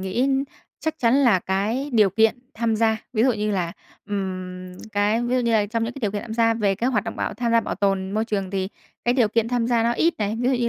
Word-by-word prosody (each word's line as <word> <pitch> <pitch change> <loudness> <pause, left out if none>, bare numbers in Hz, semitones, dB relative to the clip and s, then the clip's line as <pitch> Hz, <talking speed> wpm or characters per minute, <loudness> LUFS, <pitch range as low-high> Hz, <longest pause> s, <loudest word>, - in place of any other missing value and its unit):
nghĩ 190 +7 0 0.5
chắc 315 - -2
chắn 235 -2 +3
là 250 -8 +5
cái 210 +10 -1
điều 215 -4 +5
kiện 220 +5 +3 0.2
tham 225 -1 0
gia, 220 0 +2 0.2
ví 220 -2 +2
dụ 260 - +4
như 210 -1 -1
là, 175 -4 -1 0.4
ừm, 185 -2 -4 0.2
cái 205 +3 +2
ví 240 +1 0
dụ - - +2
như 235 -1 +1
là 210 -2 +3
trong 225 +2 -1
những 230 - -4
cái 275 - -9
điều 210 -4 0
kiện 205 - -3
tham 220 -2 -6
gia 230 0 +3
về 205 -3 +1
cái 240 +7 0
hoạt 215 -4 0
động 225 - -5
bảo - - -2
tham 235 -1 -1
gia 230 - +5
bảo - - -4
tồn 195 -1 0
môi 215 +2 0
trường 200 -4 -2
thì 190 -1 -2 0.4
cái 240 - +2
điều 240 -5 +3
kiện 230 +1 +1
tham 240 -1 0
gia 235 -1 +2
nó 235 +1 +2
ít 330 +7 +2
này, 210 +1 -1
ví 250 - +1
dụ 265 - +3
như 240 -1 +1
225 Hz, 275 wpm, -23 LUFS, 200-240 Hz, 0.5 s, là